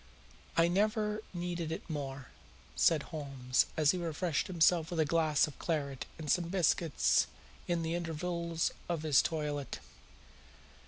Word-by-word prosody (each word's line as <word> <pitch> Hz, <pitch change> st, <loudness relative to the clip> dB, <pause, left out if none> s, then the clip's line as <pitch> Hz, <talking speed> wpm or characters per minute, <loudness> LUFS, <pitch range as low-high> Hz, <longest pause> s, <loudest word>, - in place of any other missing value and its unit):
"I 165 Hz, 0 st, +6 dB
never 210 Hz, +3 st, +1 dB
needed 175 Hz, -2 st, -3 dB
it -, -, -5 dB
more," 135 Hz, -4 st, -5 dB, 0.5 s
said 155 Hz, -3 st, +4 dB
Holmes 135 Hz, -5 st, 0 dB
as 155 Hz, -2 st, +5 dB
he 185 Hz, -, -3 dB
refreshed 165 Hz, 0 st, -1 dB
himself 170 Hz, -2 st, +3 dB
with 175 Hz, -, -3 dB
a 160 Hz, -, +4 dB
glass 155 Hz, -1 st, +3 dB
of 150 Hz, -, -10 dB
claret 140 Hz, -5 st, -2 dB
and 160 Hz, -2 st, -7 dB
some 175 Hz, +4 st, +2 dB
biscuits 170 Hz, -3 st, +2 dB, 0.4 s
in 170 Hz, -1 st, 0 dB
the 165 Hz, +1 st, -1 dB
intervals 170 Hz, 0 st, -1 dB, 0.2 s
of 165 Hz, -3 st, -1 dB
his 150 Hz, -4 st, +5 dB
toilet. 150 Hz, -3 st, -3 dB
165 Hz, 140 wpm, -33 LUFS, 150-175 Hz, 0.5 s, I